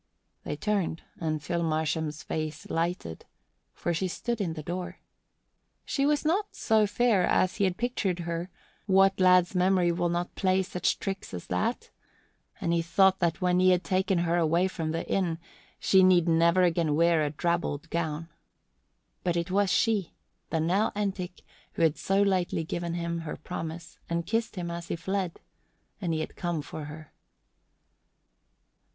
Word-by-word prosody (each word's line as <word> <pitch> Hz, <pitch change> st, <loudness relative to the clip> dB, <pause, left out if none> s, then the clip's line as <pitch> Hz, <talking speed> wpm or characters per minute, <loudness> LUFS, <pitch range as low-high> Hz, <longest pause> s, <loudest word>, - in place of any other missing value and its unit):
They -, -, -3 dB
turned 190 Hz, -2 st, -1 dB, 0.2 s
and 155 Hz, -3 st, -2 dB
Phil 170 Hz, 0 st, -1 dB
Marsham's 160 Hz, -1 st, -1 dB
face 155 Hz, -1 st, -4 dB
lighted, 165 Hz, -, -2 dB, 0.4 s
for 175 Hz, -, -2 dB
she 185 Hz, +3 st, 0 dB
stood 235 Hz, +5 st, -3 dB
in 170 Hz, -5 st, -1 dB
the 155 Hz, -1 st, -7 dB
door. 175 Hz, +2 st, -5 dB, 0.9 s
She 275 Hz, 0 st, +1 dB
was 295 Hz, 0 st, +1 dB
not 390 Hz, +7 st, 0 dB
so 220 Hz, -1 st, +3 dB
fair 210 Hz, -2 st, +2 dB
as 185 Hz, +1 st, +2 dB
he 200 Hz, -, +3 dB
had 185 Hz, -1 st, -1 dB
pictured 210 Hz, -7 st, -1 dB
her 170 Hz, +1 st, -3 dB, 0.4 s
what 195 Hz, 0 st, +4 dB
lad's 180 Hz, -1 st, +5 dB
memory 180 Hz, -1 st, +3 dB
will 175 Hz, 0 st, 0 dB
not 175 Hz, +1 st, -2 dB
play 190 Hz, -1 st, +2 dB
such 180 Hz, -1 st, -1 dB
tricks 195 Hz, -, -5 dB
as 90 Hz, -, -7 dB
that? 90 Hz, 0 st, -1 dB, 0.7 s
and 170 Hz, -, 0 dB
he 170 Hz, -, +2 dB
thought 190 Hz, +3 st, +3 dB
that 170 Hz, 0 st, 0 dB
when 180 Hz, 0 st, +3 dB
he 185 Hz, 0 st, +5 dB
had 180 Hz, 0 st, +3 dB
taken 190 Hz, 0 st, +1 dB
her 170 Hz, +1 st, +1 dB
away 170 Hz, +2 st, +3 dB
from 165 Hz, -4 st, -3 dB
the 165 Hz, +1 st, -3 dB
inn 175 Hz, -4 st, 0 dB, 0.4 s
she 190 Hz, -, +4 dB
need 180 Hz, -2 st, +5 dB
never 170 Hz, +2 st, +4 dB
again 165 Hz, -3 st, +2 dB
wear 165 Hz, 0 st, +4 dB
a 150 Hz, -, 0 dB
drabbled 165 Hz, -1 st, -1 dB
gown. 165 Hz, -1 st, -2 dB, 1.0 s
But 175 Hz, -1 st, 0 dB
it 170 Hz, +2 st, -2 dB
was 200 Hz, 0 st, +2 dB
she, 210 Hz, -6 st, +1 dB, 0.3 s
the 160 Hz, -, 0 dB
Nell 185 Hz, +7 st, +2 dB
Entick 195 Hz, -3 st, -3 dB, 0.3 s
who -, -, 0 dB
had 160 Hz, -2 st, +4 dB
so 195 Hz, +6 st, +2 dB
lightly 185 Hz, -4 st, +1 dB
given 170 Hz, +1 st, -3 dB
him 170 Hz, 0 st, -2 dB
her 165 Hz, -2 st, -6 dB
promise 165 Hz, +1 st, -7 dB
and 170 Hz, 0 st, -1 dB
kissed 225 Hz, +4 st, -1 dB
him 175 Hz, -2 st, -4 dB
as 170 Hz, 0 st, -6 dB
he -, -, -2 dB
fled, 190 Hz, 0 st, -3 dB, 0.6 s
and 175 Hz, -4 st, -1 dB
he 160 Hz, -1 st, 0 dB
had -, -, -6 dB
come 170 Hz, -4 st, -2 dB
for 150 Hz, +1 st, -7 dB
her. 155 Hz, 0 st, -10 dB
175 Hz, 170 wpm, -28 LUFS, 165-190 Hz, 1.0 s, lad's